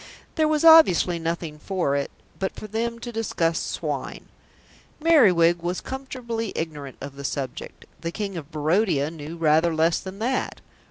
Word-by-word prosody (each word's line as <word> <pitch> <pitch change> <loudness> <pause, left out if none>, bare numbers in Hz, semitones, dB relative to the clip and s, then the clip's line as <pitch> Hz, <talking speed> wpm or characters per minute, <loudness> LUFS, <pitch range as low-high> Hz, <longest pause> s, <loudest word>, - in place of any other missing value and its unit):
There 315 -2 +2
was 310 +1 +1
obviously 185 - +7
nothing 165 -2 -4
for 175 -6 -1
it 140 - -1 0.3
but 190 -1 -2
for - - -8
them 230 +2 -2
to 240 +1 -7
discuss 175 -7 0
swine. - - -4 0.7
Merriwig 185 - +5
was 175 +2 -2
comfortably 245 -5 -5
ignorant 150 -4 -5
of 140 0 -8
the 140 - -7
subject. 140 -1 -5
The 165 - -4
King 200 0 -4
of 155 -4 -7
Barodia 155 -1 +1
knew 160 +1 -8
rather 160 +1 +3
less 165 +1 +2
than 190 +1 -8
that. 250 +5 -2
175 Hz, 155 wpm, -24 LUFS, 160-225 Hz, 0.7 s, obviously